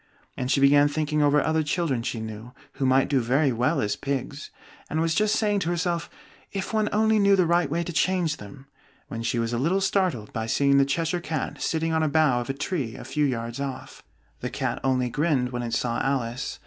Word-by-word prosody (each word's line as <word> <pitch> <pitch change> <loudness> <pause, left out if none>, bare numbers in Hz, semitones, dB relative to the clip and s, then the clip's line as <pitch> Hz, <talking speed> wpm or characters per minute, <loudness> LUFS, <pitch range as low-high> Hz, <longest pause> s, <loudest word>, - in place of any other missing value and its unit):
And 125 - -3
she 140 - +3
began 145 +1 +6
thinking 150 0 -1
over 145 0 +4
other 160 0 +1
children 150 -5 -1
she 115 -1 -3
knew, 110 +2 -8 0.2
who 135 - -1
might 130 +1 +4
do 140 -2 +2
very 130 +4 +2
well 125 +7 +1
as 105 -1 0
pigs, 140 +1 -4 0.4
and 160 - -1
was 165 0 +1
just 215 +4 +2
saying 205 -2 +1
to 170 -3 -2
herself, 175 -1 -1 0.4
"If 195 +2 -4
one 215 -1 +1
only 220 +1 +3
knew 200 -1 +5
the 185 -2 +3
right 170 -2 +2
way 170 +4 -1
to 175 - -6
change 175 -3 +1
them 130 +6 -12 0.2
" - - -34
when 115 - -5
she 115 +1 -1
was 115 0 -1
a 120 - 0
little 170 +9 +1
startled 185 - 0
by 110 -1 -3
seeing 140 +3 +3
the 140 - +4
Cheshire 165 +5 -1
Cat 160 -2 -4
sitting 160 0 0
on 160 - +2
a 155 - +1
bough 145 -5 +3
of 120 - -7
a - - 0
tree 140 - -3
a - - -9
few 150 -1 0
yards 120 -2 -3
off. 140 -2 -6 0.4
The - - -4
Cat - - -2
only 130 -1 +1
grinned 145 -4 +1
when 120 -1 -3
it 115 -1 -2
saw 120 -1 -1
Alice. 135 -2 -2
145 Hz, 225 wpm, -25 LUFS, 125-170 Hz, 0.4 s, began